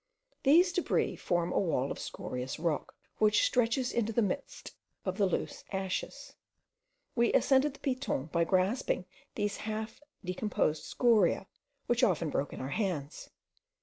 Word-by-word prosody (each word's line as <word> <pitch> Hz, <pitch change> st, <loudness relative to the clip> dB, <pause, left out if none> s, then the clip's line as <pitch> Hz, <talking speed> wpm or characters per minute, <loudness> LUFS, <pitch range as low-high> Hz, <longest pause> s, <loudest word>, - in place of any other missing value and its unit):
These 340 Hz, +6 st, +5 dB
debris 360 Hz, -, +1 dB
form 175 Hz, -1 st, 0 dB
a -, -, +3 dB
wall 145 Hz, -8 st, 0 dB
of -, -, -5 dB
scorious 125 Hz, +1 st, -5 dB
rock, 160 Hz, -3 st, -2 dB, 0.2 s
which 210 Hz, -1 st, +4 dB
stretches 245 Hz, +1 st, +1 dB
into 225 Hz, -1 st, 0 dB
the 230 Hz, +1 st, +2 dB
midst 240 Hz, +8 st, -4 dB, 0.3 s
of 185 Hz, +1 st, -2 dB
the 200 Hz, -, +4 dB
loose 180 Hz, -, -3 dB
ashes. 190 Hz, -1 st, -4 dB, 0.8 s
We 235 Hz, -1 st, +3 dB
ascended 275 Hz, +1 st, +3 dB
the -, -, -18 dB
Piton 255 Hz, -, -1 dB
by 170 Hz, -, +2 dB
grasping 185 Hz, +2 st, +1 dB, 0.3 s
these 205 Hz, -1 st, -1 dB
half 220 Hz, +2 st, -5 dB, 0.2 s
decomposed 180 Hz, -4 st, 0 dB
scoriae, 220 Hz, -7 st, +3 dB, 0.4 s
which 240 Hz, +1 st, +1 dB
often 170 Hz, -8 st, +2 dB
broke 140 Hz, 0 st, -1 dB
in -, -, -7 dB
our 130 Hz, -, -4 dB
hands. 155 Hz, -5 st, -3 dB
205 Hz, 145 wpm, -31 LUFS, 170-240 Hz, 0.8 s, These